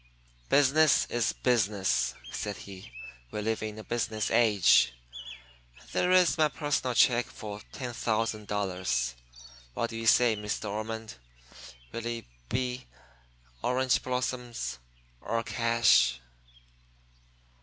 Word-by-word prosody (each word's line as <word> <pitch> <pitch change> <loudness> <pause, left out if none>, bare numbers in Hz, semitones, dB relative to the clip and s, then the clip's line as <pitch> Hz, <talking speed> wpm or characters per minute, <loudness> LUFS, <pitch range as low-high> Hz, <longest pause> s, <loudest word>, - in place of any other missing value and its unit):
"Business 145 +2 +4
is 120 -3 +1
business," 105 -6 +1 0.2
said 105 -1 -4
he. 95 -6 -11 0.4
"We 105 - -5
live 110 +1 -1
in 110 0 -5
a 110 - -8
business 110 -2 -2
age. 105 - +5 1.0
There 180 - +1
is 180 -6 +4
my 155 - +5
personal 145 -3 -1
check 120 0 +4
for 105 -1 -8
$10,000. 105 - -2 0.6
What 115 - -2
do 115 - -5
you 115 0 -3
say, 120 -1 +5
Miss 105 0 -3
De - - -6
Ormond 110 - -5 0.7
will 115 0 -5
it 120 -1 -4 0.2
he 125 0 -2 0.7
orange 130 +1 +1
blossoms 125 - -3 0.4
or 115 0 -2
cash?" 115 - +3
115 Hz, 110 wpm, -29 LUFS, 105-125 Hz, 1.0 s, age